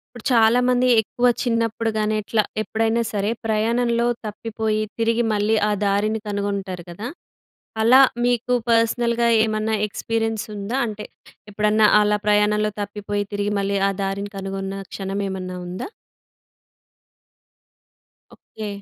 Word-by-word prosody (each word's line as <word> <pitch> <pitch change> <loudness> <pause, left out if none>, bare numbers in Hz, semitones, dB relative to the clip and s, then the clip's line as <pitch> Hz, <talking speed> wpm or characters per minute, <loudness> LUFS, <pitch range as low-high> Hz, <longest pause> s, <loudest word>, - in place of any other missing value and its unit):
ఇప్పుడు, 240 - -10
చాలా 230 +1 +5
మంది 250 0 +3
ఎక్కువ 245 +3 0 0.2
చిన్నప్పుడు 230 -1 0
గాని 215 0 0
ఎట్లా, 215 +1 +1 0.2
ఎప్పుడైనా 225 +1 0
సరే 205 +1 0
ప్రయాణంలో 235 +2 +1 0.2
తప్పిపోయి 215 0 -2 0.2
తిరిగి 230 +1 +2
మళ్ళీ 210 +1 +2
ఆ - - +1
దారిని 205 +2 +1
కనుగొంటారు 200 -3 -3
గదా! 205 +7 -6 0.7
అలా 250 +4 +7 0.2
మీకు 245 0 +1 0.2
పర్సనల్‌గా 235 +1 +2 0.2
ఏమన్నా 215 0 -1
ఎక్స్‌పీరియన్స్ 225 +1 -2
ఉందా? 205 +5 -3
అంటే 210 -1 -6 0.5
ఎప్పుడన్నా 210 +1 +3
అలా 210 0 +2
ప్రయాణంలో 210 0 +3
తప్పిపోయి, 205 0 -3
తిరిగి 205 0 -1
మళ్ళీ 200 0 0
ఆ - - 0
దారిని 200 +1 -3
కనుగొన్న 195 0 -4 0.2
క్షణం 195 0 -4
ఏమన్నా 185 -1 -5
ఉందా? 185 +7 -5 2.5
ఓకే. 215 -1 -9
215 Hz, 120 wpm, -22 LUFS, 205-230 Hz, 2.5 s, అలా